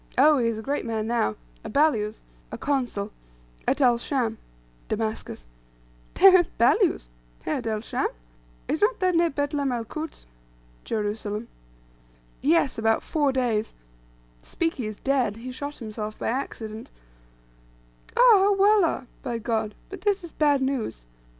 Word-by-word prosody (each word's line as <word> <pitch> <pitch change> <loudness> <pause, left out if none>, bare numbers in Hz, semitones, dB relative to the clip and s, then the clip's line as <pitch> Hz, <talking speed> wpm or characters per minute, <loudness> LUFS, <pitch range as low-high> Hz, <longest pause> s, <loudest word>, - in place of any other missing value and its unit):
Oh, 295 +2 +6
he 235 - +2
is 230 -1 -1
a 220 - -6
great 285 +4 -1
man 225 -2 -2
now; 220 - 0 0.3
a - - -6
balyuz 225 -8 +1 0.3
(a - - -5
consul) 245 -8 -1 0.6
at 275 +2 +1
El 245 -3 +4
Scham" 235 -4 -1 0.5
(Damascus.) 215 - -3 0.7
"Heh 390 +1 +9
heh; 370 -1 +7 0.2
balyuz! 285 - +3 0.3
Heh, 155 - -1
at 240 - -5
El 215 -1 -1
Scham! - - -1 0.6
Is 310 - -1
not 435 +3 +2
that 370 -1 +2
near 335 0 +3
Betlem 285 -1 -1
el 235 -2 -2
Kuds?" 310 +7 -7 0.6
(Jerusalem.) 210 0 -3 0.9
"Yes, 295 -4 +2
about 225 0 +2
four 290 -3 +1
days. 240 -5 -1 0.7
Spiki 325 - -2
is 215 -1 -6
dead. 265 -6 +1
He 250 +3 -7
shot 285 +3 -6
himself 215 -2 -6
by - - -2
accident." 225 -3 -4 1.3
"Ah, - - 0 0.3
ah, 410 - +4
Wallah 395 -8 +3 0.2
(by 240 -3 -3
God), 220 -2 -2 0.2
but 390 - -7
this 405 -2 +1
is 340 - -8
bad 290 -3 +2
news. 260 - -2
250 Hz, 145 wpm, -25 LUFS, 220-295 Hz, 1.3 s, Heh